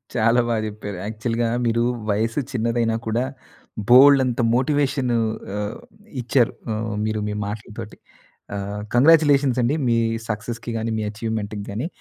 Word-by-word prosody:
చాలా 115 +1 +3
బా 115 - +1
జెప్పారు. 105 -2 -6
యాక్చువల్‌గా 115 +2 -1 0.2
మీరు 115 0 +2 0.3
వయసు 115 +5 0
చిన్నదైనా 115 -1 0
కూడా 115 +3 +1 0.7
బోలెడంత 130 -1 +6
మోటివేషన్ 135 -1 +1 0.4
ఆహ్, 105 +1 -3 0.4
ఇచ్చారు. 120 0 +2 0.2
ఆహ్, 110 0 -3
మీరు 110 0 -1
మీ 105 - -2
మాటలతోటి. 105 +1 -7 0.6
ఆహ్, 100 +1 -4
కంగ్రాచ్యులేషన్స్ 140 -2 +5
అండి. 125 +6 +1
మీ 115 - +3 0.3
సక్సెస్‌కి 115 +2 -4
గానీ, 115 +1 -2
మీ - - -2
అచీవ్మెంట్‌కి 105 -2 -4
గానీ 115 +10 -3
115 Hz, 125 wpm, -22 LUFS, 110-125 Hz, 0.7 s, బోలెడంత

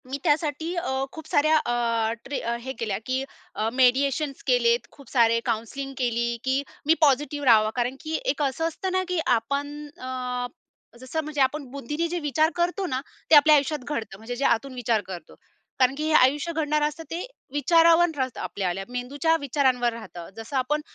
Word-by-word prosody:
मी 275 - -2
त्यासाठी 305 +2 0
अ, 270 -7 -1
खूप 320 -2 -10
साऱ्या 310 +2 +4
अ, 230 -4 0
ट्रे 275 +1 -3
अ, 235 0 -2
हे 265 +2 -5
केल्या 215 -4 -1
की 260 +1 -1 0.3
अ, 215 +1 0
मेडिएशन्स 270 +3 +2
केलेत, 475 -1 +3
खूप 280 -4 -16
सारे 230 -2 +4
काउन्सलिंग 245 +4 -3
केली, 235 -1 0
की 265 +1 +1 0.2
मी 315 - +6
पॉझिटिव्ह 290 0 +2
राहावं, 215 -3 +6
कारण 245 +1 -1
की 315 0 -2
एक 285 +2 0
असं 285 +3 0
असतं 370 +3 -4
ना, 375 0 +1
की 360 -1 -1 0.2
आपण 280 +6 -2 0.3
अ, 250 -1 -3 0.5
जसं 260 +5 -3
म्हणजे 300 -2 -2
आपण 280 +2 +1
बुद्धीने 295 +5 -3
जे 350 +1 -2
विचार 310 +1 +2
करतो 355 +3 0
ना, 260 -6 -2 0.3
ते 320 - +8
आपल्या 300 +1 +8
आयुष्यात 295 +1 +1
घडतं, 225 -9 -4
म्हणजे 225 +4 -6
जे 275 - -1
आतून 260 +4 +1
विचार 235 -3 0
करतो, 180 -2 -9 0.4
कारण 260 +1 +4
की 305 - -2
हे - - 0
आयुष्य 295 +3 +4
घडणारं 300 -2 +1
असतं 310 +2 -7
ते 335 +2 -3 0.3
विचारावरन 330 +4 +5
राहतं, 260 -2 -2
आपल्या 190 -3 -2 0.2
मेंदूच्या 270 +6 0
विचारांवर 255 -3 +1
राहतं. 180 -7 -9
जसं 225 +5 -7
आपण 295 +4 0
275 Hz, 180 wpm, -25 LUFS, 245-305 Hz, 0.5 s, ते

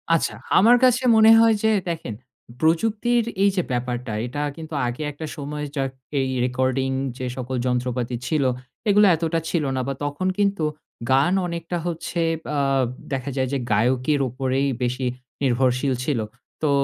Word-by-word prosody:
আচ্ছা। 165 - -1 0.2
আমার 235 +5 +6
কাছে 250 0 +4
মনে 220 0 +7
হয় 225 -1 +5
যে 220 - +4 0.2
দেখেন, 165 -9 -4 0.5
প্রযুক্তির 225 +9 +2 0.2
এই 200 - +6
যে 180 - +1
ব্যাপারটা 125 -1 -2
এটা 130 +4 -4 0.2
কিন্তু 160 -1 -8
আগে 120 +5 -4
একটা 150 +2 -7
সময় 150 +1 -4
যা 135 - 0 0.4
এই 135 -1 0 0.2
রেকর্ডিং 130 +1 0 0.3
যে 130 - -4
সকল 130 +1 -4
যন্ত্রপাতি 125 -1 -1
ছিল। 150 0 +1 0.5
এগুলো 205 +1 +6
এতটা 165 0 -1
ছিল 165 -3 0
না 130 - 0
বা 135 - -1
তখন 145 +6 -2
কিন্তু 200 -4 +1 0.5
গান 140 +7 +4
অনেকটা 170 0 -4
হচ্ছে 170 0 -3 0.4
আ - - +2 0.5
দেখা 135 +1 -2
যায় 130 -1 0
যে - - +2
গায়কের 125 +7 +2
উপরেই 130 +2 0 0.2
বেশি 125 +1 -1 0.4
নির্ভরশীল 130 +1 +2
ছিল। 135 -3 0 0.4
তো 155 - +2
140 Hz, 155 wpm, -23 LUFS, 130-170 Hz, 0.5 s, মনে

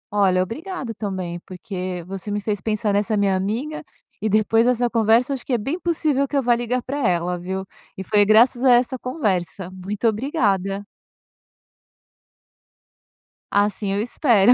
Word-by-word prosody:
Olha, 185 -3 +3
obrigado 270 - -5
também, 190 -5 -4
porque 185 0 -6
você 195 +2 -7
me 205 0 -1
fez 205 -1 -2
pensar 215 0 0
nessa 210 +2 +1
minha 200 -2 +2
amiga, 230 +13 -3 0.4
e 215 - 0
depois 215 +3 +3
essa 245 -1 +2
conversa, 230 +2 +3
eu - - +1
acho 265 - -5
que 265 - -2
é - - +3
bem 275 - -3
possível 305 -5 +1
que 285 - -1
eu 275 - +1
vá 240 0 +4
ligar 240 +1 -2
pra 280 +2 -4
ela, 175 0 0
viu. 190 +2 -4 0.3
E 190 - -4
foi 205 +2 +3
graças 230 +4 +4
a 260 - +6
essa 250 +2 +2
conversa, 190 - -2
muito 195 +4 -3
obrigada. 205 - 0 2.7
Assim 205 0 +1
eu 200 - 0
espero, 235 -2 +4
215 Hz, 160 wpm, -22 LUFS, 195-245 Hz, 2.7 s, a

